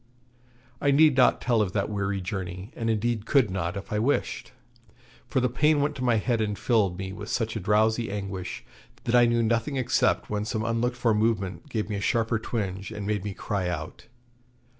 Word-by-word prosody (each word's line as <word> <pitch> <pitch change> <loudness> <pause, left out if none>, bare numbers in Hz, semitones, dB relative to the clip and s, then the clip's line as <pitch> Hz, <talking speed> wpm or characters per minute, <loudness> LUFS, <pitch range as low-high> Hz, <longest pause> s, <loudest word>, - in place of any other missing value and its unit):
I 140 - +2
need 145 0 +5
not 130 -1 +4
tell 120 -3 +2
of 95 -3 -1
that 100 - 0
weary 100 -2 -2
journey, 95 +2 -5
and 115 -1 -2
indeed 110 0 0
could 130 -9 +3
not, 90 -1 -2
if 100 +3 -7
I 105 - +1
wished; 130 +6 -1 0.8
for - - +1
the 125 - +2
pain 150 +5 +2
went 145 +1 +1
to 130 - -4
my 120 -2 +3
head 115 +1 +1
and 105 -2 -1
filled 105 -7 +1
me 95 0 -5
with 105 +1 -8
such 115 -2 -1
a - - -1
drowsy 110 +3 +2
anguish 100 -2 -5 0.4
that 115 - -2
I 120 -1 +6
knew 120 0 +2
nothing 115 +5 0
except 130 -2 +1
when 105 0 -2
some 110 0 -2
unlooked 115 +2 0
for 120 -2 +2
movement 105 - -1
gave 110 -5 -2
me 105 -1 -3
a - - -4
sharper 115 +1 +1
twinge, 100 -4 -3
and 105 - -5
made 105 -2 -1
me 100 -2 -4
cry 100 -4 -2
out. 80 -3 -6
110 Hz, 205 wpm, -26 LUFS, 100-120 Hz, 0.8 s, I